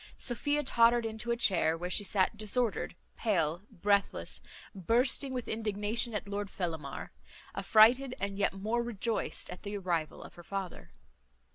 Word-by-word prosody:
Sophia 290 +4 0
tottered 235 -2 +4
into 220 +1 -4
a 235 - +1
chair, 170 -7 +3
where 175 +2 -4
she 205 - +3
sat 195 +1 +1
disordered, 215 +2 0 0.2
pale, 170 -6 +1
breathless, 200 +2 0 0.3
bursting 240 - +1
with 250 -2 -4
indignation 220 +1 -1
at 205 - -3
Lord 200 0 -3
Fellamar; 160 -7 -5 0.4
affrighted, 245 +4 +5
and 200 0 -2
yet 200 -1 +1
more 215 +5 -1
rejoiced, 230 -4 -2
at 180 - -8
the 205 0 -4
arrival 170 -5 -2
of - - -12
her 175 - -13
father. 195 -1 -6
210 Hz, 145 wpm, -31 LUFS, 190-235 Hz, 0.4 s, affrighted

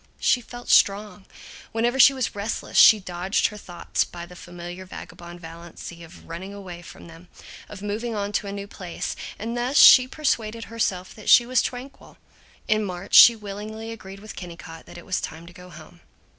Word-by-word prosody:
She 250 - +2
felt 245 +1 -11
strong. 200 -1 +2 0.5
Whenever 240 +3 0
she 275 - +9
was 260 -3 -3
restless 205 +2 -5
she 215 - +8
dodged 185 +1 -1
her 210 - -11
thoughts 175 -4 -3
by 170 -1 -9
the 180 +1 -14
familiar 175 +1 -9
vagabond 175 -1 -11
fallacy 170 +1 -10
of 165 +2 -15
running 185 +4 -8
away 180 -4 -9
from 175 - -13
them, 165 +1 -14 0.4
of 205 -1 -10
moving 220 +3 -3
on 205 0 -3
to 205 - -2
a - - -5
new 200 0 -6
place, 185 -3 -6 0.2
and 230 +3 -5
thus 250 +4 -1
she 255 -1 +9
persuaded 230 -6 -2
herself 185 -5 -2
that 215 - -7
she 240 - +7
was 255 0 +2
tranquil. 255 +2 -8 0.5
In 215 0 +2
March 185 0 -7
she 235 - +10
willingly 215 +2 -8
agreed 195 -3 -10
with 215 - -10
Kennicott 170 -2 -10
that - - -12
it 175 - -12
was 185 - -2
time 160 +1 -7
to 175 - -14
go 180 0 -13
home. - - -14
200 Hz, 185 wpm, -24 LUFS, 175-225 Hz, 0.5 s, she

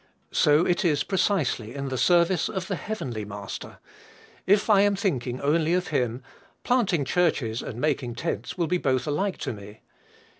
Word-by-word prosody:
So 150 +3 +4
it 180 +3 +1
is 150 -5 +2
precisely 170 - 0
in 140 -1 -4
the 130 - -3
service 175 +2 +3
of 190 -4 -3
the 195 - -2
heavenly 135 - -4
Master: 100 -1 -7 0.7
if 205 +2 +4
I 205 -3 +5
am 205 0 +3
thinking 130 - -2
only 160 +4 +2
of 180 0 -1
him, 125 -3 -1 0.4
planting 195 - +1
churches 135 -10 +1
and 115 - -7
making 125 -5 -1
tents 115 - -4
will 170 - +1
be 180 +3 0
both 130 -4 0
alike 180 +6 -1
to - - -2
me. 105 +1 -12
155 Hz, 165 wpm, -26 LUFS, 125-185 Hz, 0.7 s, I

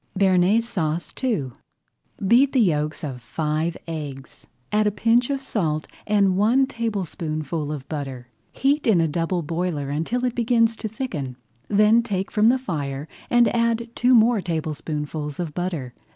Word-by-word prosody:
BEARNAISE 195 +4 +3
SAUCE 170 -7 -2
II 180 - 0 0.8
Beat 260 +6 +5
the 265 - +3
yolks 155 -7 +1
of 130 -4 -5
five 155 +6 -2
eggs, 145 -5 -7 0.2
add 210 0 +3
a - - +2
pinch 235 +4 +2
of 275 -1 -2
salt 155 - -1 0.2
and 200 -3 +3
one 230 +7 +4
tablespoonful 165 - -3
of 140 -3 -6
butter. 135 -5 -5 0.2
Heat 285 +1 +1
in 205 -6 +5
a 165 - +3
double 165 +3 -1
boiler 165 -3 -2
until 165 - -1
it 250 - 0
begins 230 -1 +2
to 220 - -4
thicken, 190 - -4 0.3
then 210 +3 +5
take 195 -5 -3
from 215 +1 +4
the 255 - +4
fire 145 - -4 0.2
and 240 -1 +4
add 235 0 +1
two 250 +1 +4
more 230 -1 +5
tablespoonfuls 155 -2 -4
of 165 -4 -3
butter. 165 -9 -3
180 Hz, 150 wpm, -23 LUFS, 155-230 Hz, 0.8 s, Beat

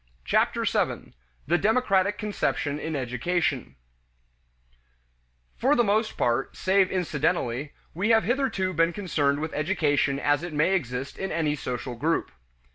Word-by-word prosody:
Chapter - - +1
Seven: - - -1 0.3
The 175 +4 +2
Democratic 205 -2 +2
Conception 155 -8 -2
in 160 0 -4
Education 130 - -1 1.8
For 275 +4 +2
the 240 - +4
most 215 +1 0
part, 120 +2 0
save 190 0 +3
incidentally, 150 -6 -1 0.2
we 200 +6 -1
have 225 -1 +5
hitherto 235 -8 0
been 165 +1 +2
concerned 145 -8 0
with 160 +1 -4
education 145 -4 +1
as 145 0 +2
it 175 -2 -6
may 150 +6 +2
exist 135 -6 -3
in 190 -1 -3
any 160 -2 0
social 125 -2 -4
group. 155 - -1
160 Hz, 130 wpm, -26 LUFS, 140-195 Hz, 1.8 s, have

